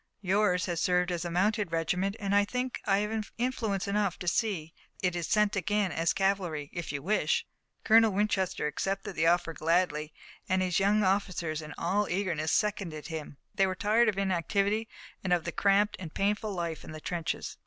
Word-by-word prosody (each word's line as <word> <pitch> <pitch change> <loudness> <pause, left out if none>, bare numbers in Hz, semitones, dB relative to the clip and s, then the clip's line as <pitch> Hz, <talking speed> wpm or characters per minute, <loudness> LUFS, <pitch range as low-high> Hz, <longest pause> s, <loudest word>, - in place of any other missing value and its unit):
Yours 190 -2 +2
has 175 -2 -2
served 180 0 +2
as 175 -1 -2
a 175 - -3
mounted 195 +2 +1
regiment, 180 +4 0
and 200 -1 -1
I 205 0 +5
think 250 +4 -3
I 195 -1 +4
have 215 0 -4
influence 225 -6 -1
enough 200 -2 0
to 180 - -7
see 175 -5 0 0.3
that 185 - +4
it 175 - -9
is 170 -1 -2
sent 210 -1 +2
again 200 -1 0
as 165 +2 +1
cavalry, 180 -7 -1
if 175 -1 -4
you 140 -1 -4
wish." 335 - +1 0.4
Colonel 225 0 +6
Winchester 195 -4 0
accepted 195 +7 -2
the 160 +1 +2
offer 170 -1 +2
gladly, 160 -2 +1 0.4
and 185 0 +2
his 180 -1 +1
young 205 +2 +3
officers, 185 -5 0
in 150 - -9
all 200 +5 0
eagerness, 175 -5 -1
seconded 185 -8 -1
him. 155 -3 -6 0.2
They 195 - +3
were 185 - -2
tiring 220 +4 +3
of 200 - -2
inactivity, 200 +3 0 0.4
and 185 - -2
of 175 -2 +3
the 170 - -3
cramped 200 +3 +2
and 170 -4 -7
painful 210 +3 0
life 170 -4 -3
in - - -9
the 155 - -7
trenches. 170 +1 -3
190 Hz, 190 wpm, -29 LUFS, 170-205 Hz, 0.4 s, Colonel